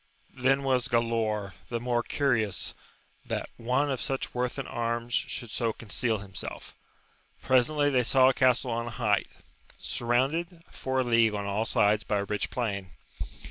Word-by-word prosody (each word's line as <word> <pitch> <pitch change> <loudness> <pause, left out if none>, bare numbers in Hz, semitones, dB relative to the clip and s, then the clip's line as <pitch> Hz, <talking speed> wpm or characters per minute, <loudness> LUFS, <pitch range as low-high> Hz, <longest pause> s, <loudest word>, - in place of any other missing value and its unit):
Then 135 +1 +2
was 130 -3 +2
Galaor 115 -4 0 0.2
the 120 - -2
more 120 0 0
curious 115 -8 0 0.5
that - - -4
one 130 +5 +1
of 130 - -2
such 135 -2 -2
worth 125 +1 -1
in 135 - -3
arms 115 0 -2
should 115 0 -1
so 115 -1 0
con 115 - -13
ceal 110 -2 +1
himself 95 -1 -7 0.7
Presently 145 +3 +3
they 130 -2 +4
saw 130 +2 +5
a 130 - +5
castle 125 -1 +3
on 115 +1 -2
a 115 - -7
height, 105 -5 +2 0.5
surrounded 155 +9 -1
for 130 0 -1
a - - +1
league 115 -3 +3
on 100 -1 -3
all 105 +3 -1
sides 105 +1 +3
by 105 - 0
a 100 - 0
rich 105 +1 -2
plain. 100 -7 -3
120 Hz, 165 wpm, -28 LUFS, 110-130 Hz, 0.7 s, saw